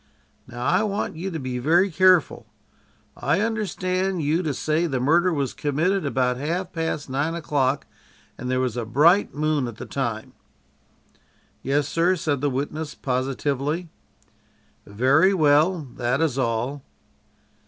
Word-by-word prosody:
"Now 120 0 -6
I 180 +2 +3
want 210 -4 -2
you 180 +4 -4
to 165 - -4
be 130 -3 -4
very 175 +9 +3
careful. 185 0 +3 0.7
I - - 0
understand 190 -5 -1
you 155 +4 +1
to 155 -4 -1
say 155 +5 0
the 135 -5 -2
murder 170 +8 +3
was 140 -5 -1
committed 155 +5 0
about 125 -2 0
half 170 +7 -3
past 160 -3 -3
nine 145 +5 -1
o'clock, 140 -4 0 0.5
and 125 - -6
there 130 0 +1
was 125 -3 -1
a 120 - -2
bright 155 - +3
moon 150 -3 0
at 120 - -7
the - - -8
time?" 115 -5 -4 1.3
"Yes, 140 +1 0
sir," 170 +4 +2
said 145 -5 -2
the 145 - +1
witness 145 +3 -4
positively. 140 +5 -2 1.0
"Very 135 - +3
well. 155 +2 +3 0.2
That 125 +2 0
is 150 -5 0
all." 125 +3 -1
150 Hz, 145 wpm, -23 LUFS, 130-170 Hz, 1.3 s, I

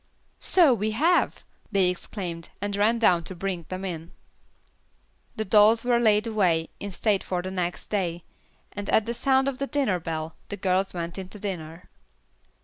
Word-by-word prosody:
"So 335 -8 +5
we 215 -1 -1
have!" 340 +6 +2 0.3
they 195 -3 +3
exclaimed, 180 -2 -4
and 205 0 -2
ran 215 +3 +3
down 180 -7 +3
to 185 - -5
bring 175 -2 -4
them 185 +1 -4
in. 165 -2 -6 1.2
The 220 - -2
dolls 215 +3 +5
were 240 -1 +3
laid 215 -2 +3
away 180 -8 +1
in 205 - -5
state 200 +1 0
for 180 -1 -2
the 185 - -4
next 180 -2 -3
day, 175 -5 -1 0.5
and 205 -1 -6
at 220 - +3
the 235 - -2
sound 265 +2 +2
of 270 -2 -2
the 275 - -1
dinner 265 -12 0
bell, 160 -1 -4
the 205 - -4
girls 185 0 0
went 170 +2 -4
into 190 +2 -8
dinner. 175 -5 -6
195 Hz, 170 wpm, -26 LUFS, 175-220 Hz, 1.2 s, So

